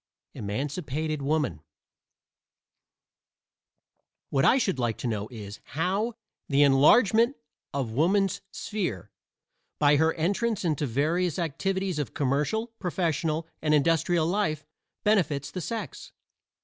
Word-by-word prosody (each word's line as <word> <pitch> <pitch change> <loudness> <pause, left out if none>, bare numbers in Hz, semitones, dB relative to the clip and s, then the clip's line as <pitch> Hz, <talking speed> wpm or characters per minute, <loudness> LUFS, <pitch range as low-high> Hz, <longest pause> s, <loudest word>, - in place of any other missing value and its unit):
EMANCIPATED 145 - -3
WOMAN 145 - 0 2.7
What 135 -1 +2
I 260 - +6
should 195 - 0
like 120 -3 0
to - - -4
know 105 -2 -2
is, 105 -3 -9
how 195 - -1 0.3
"the 140 0 +5
enlargement 220 - +5 0.4
of 135 -5 -2
woman's 190 - +2
sphere" 180 - -4 0.7
by 145 0 +4
her 160 +2 +3
entrance 200 +5 0
into 150 -3 0
various 160 +7 0
activities 185 +1 -1
of 145 - -4
commercial, 150 - 0
professional 165 -3 -1
and 155 -1 +3
industrial 165 +2 +2
life 165 -5 0 0.4
benefits 170 -10 +1
the 185 - -4
sex. 225 +6 -5
160 Hz, 110 wpm, -27 LUFS, 140-190 Hz, 2.7 s, I